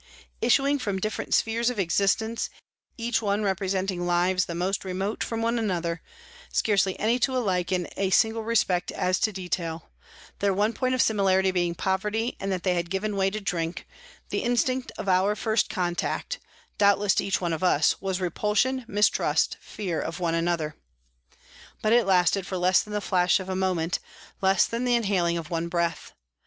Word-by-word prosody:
Issuing 275 +4 +3
from 205 -6 -2
different 215 +3 -3
spheres 230 +2 +2
of 250 - -4
existence, 200 +5 +1 0.5
each 230 -1 0
one 205 0 0
representing 190 -2 -1
lives 180 +1 +2
the 170 - -5
most 185 +3 -1
remote 190 +3 -2
from 230 -1 -3
one 230 +1 +1
another, 175 -5 -2 0.5
scarcely 195 -3 +1
any 230 +4 +2
two 260 +1 +1
alike 185 -7 0
in 180 -2 0
a 195 -1 0
single 220 +4 +2
respect 205 -6 +1
as 185 0 0
to 215 - +1
detail, 175 - -4 0.5
their 200 -1 +1
one 210 +3 +1
point 255 +1 0
of 255 - +4
similarity 190 -3 +2
being 175 -2 0
poverty 210 +6 -1
and 195 0 -3
that 185 -2 -2
they 185 - +2
had 170 -1 -2
given 200 +3 -2
way 195 0 +2
to 215 +2 -4
drink, 170 -4 -3 0.4
the - - -1
instinct 250 +2 0
of - - -5
our 190 +2 +3
first 220 0 0
contact, 185 - -2 0.4
doubtless 200 -1 +4
to - - +1
each 195 - 0
one 175 -2 -1
of 160 - -3
us, 155 -5 +3
was 190 -1 -2
repulsion, 210 +8 0
mistrust, 210 0 +2
fear 180 -6 -4
of 165 - -5
one 170 -2 0
another. 165 -2 -1 1.1
But 215 +1 +3
it 235 -3 +4
lasted 185 +1 +3
for 185 - -3
less 180 +1 +4
than 210 - -9
the 210 - -1
flash 180 -2 +2
of 190 0 -7
a 190 - -1
moment, 180 -2 0 0.4
less 190 0 +4
than 230 +2 -3
the 245 -1 +3
inhaling 190 -7 +1
of 165 -1 -6
one 165 0 -1
breath. 170 -1 -2
195 Hz, 180 wpm, -26 LUFS, 180-215 Hz, 1.1 s, of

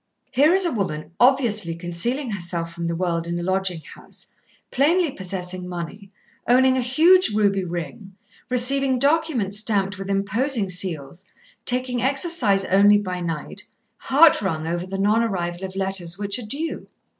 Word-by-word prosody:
"Here 280 +5 +4
is 380 0 +3
a 340 - 0
woman 155 -8 -4
obviously 235 -9 +2
concealing 200 - -1
herself 170 -3 -4
from 170 0 -4
the 170 - -2
world 170 -1 -2
in 170 0 -3
a 175 - -4
lodging 185 -2 -1
house, - - -11 0.4
plainly 320 +4 +2
possessing 185 -3 -6
money, 180 +3 -7 0.4
owning 260 +2 +4
a 260 - 0
huge 325 +10 +4
ruby 200 -2 +1
ring, 175 +3 -7 0.3
receiving 260 +1 +2
documents 280 -8 +1
stamped 200 -3 +1
with 195 0 -6
imposing 200 +3 0
seals, 180 -2 -4 0.4
taking 250 -1 0
exercise 265 - +1
only 205 +2 +5
by 185 -3 -4
night, 165 -3 -5 0.4
heart 295 +1 +5
wrung 160 -5 -2
over 175 +2 -3
the 195 +1 -5
non 210 +4 +2
arrival 180 -5 -3
of 190 0 -9
letters 190 -3 +1
which 200 +3 -2
are 230 - -8
due. 305 +8 -4
200 Hz, 155 wpm, -22 LUFS, 180-255 Hz, 0.4 s, only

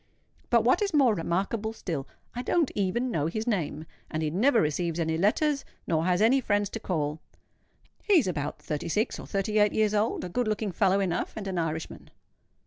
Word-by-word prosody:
But 235 -2 +4
what 255 - +3
is 395 -5 0
more 265 -6 +5
remarkable 200 +5 -1
still, 160 -10 -4 0.3
I 245 - -3
don't 320 +3 +1
even 210 +6 0
know 155 -6 0
his 215 +7 -3
name; 165 -9 -2 0.2
and 155 +1 -2
he 155 - -1
never 230 - +3
receives 165 0 0
any 160 -1 0
letters, 275 - +1 0.2
nor 160 -1 0
has 180 +3 +2
any 260 +4 +4
friends 205 -3 0
to 225 - -4
call. 155 -6 -2 0.8
He 415 - +1
is 300 - +4
about 150 -5 -3
thirty 150 0 -4
six 210 +6 0
or - - -9
thirty 210 +2 0
eight 210 -1 +4
years 215 -1 +2
old, 215 +2 0
a 180 - -4
good 245 +6 -1
looking 215 -1 -1
fellow 195 +2 +2
enough, 180 -3 -1
and 210 - -5
an 185 -2 -2
Irishman." 160 -1 -4
200 Hz, 200 wpm, -28 LUFS, 165-225 Hz, 0.8 s, more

